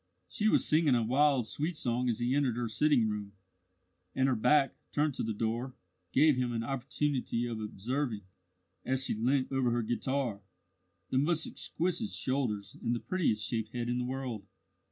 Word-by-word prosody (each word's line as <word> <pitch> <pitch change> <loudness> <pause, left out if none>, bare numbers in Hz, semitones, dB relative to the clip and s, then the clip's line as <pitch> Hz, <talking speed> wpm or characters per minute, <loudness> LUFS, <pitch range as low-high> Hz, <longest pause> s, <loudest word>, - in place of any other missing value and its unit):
She 215 -2 0
was - - +4
singing 155 -4 +4
a 120 - +2
wild 135 +1 +3
sweet 155 +8 -2
song 125 -1 0
as 115 - 0
he 120 +1 0
entered 135 -4 +2
her 120 -1 -1
sitting 130 0 +3
room, 105 -1 -4 0.8
and 130 0 +3
her 130 - +2
back, 135 +5 +3 0.2
turned 150 0 +1
to - - -3
the 110 - -1
door, 115 +4 -2 0.4
gave 145 - +5
him 125 -1 0
an 115 -1 -2
opportunity 135 -1 -1
of 115 -2 -4
observing, 110 +2 -3 0.6
as 130 0 0
she - - +1
leant 130 +5 +1
over 135 -2 +2
her 120 0 0
guitar, 120 -1 -1 0.7
the 130 - +3
most 160 +2 +1
exquisite 185 +6 -2
shoulders 115 - -2
and 120 +1 0
the - - -2
prettiest 115 -13 0
shaped 110 -2 -3
head 120 -1 -2
in 125 0 0
the 125 - -1
world. 125 -6 -4
125 Hz, 175 wpm, -31 LUFS, 115-140 Hz, 0.8 s, gave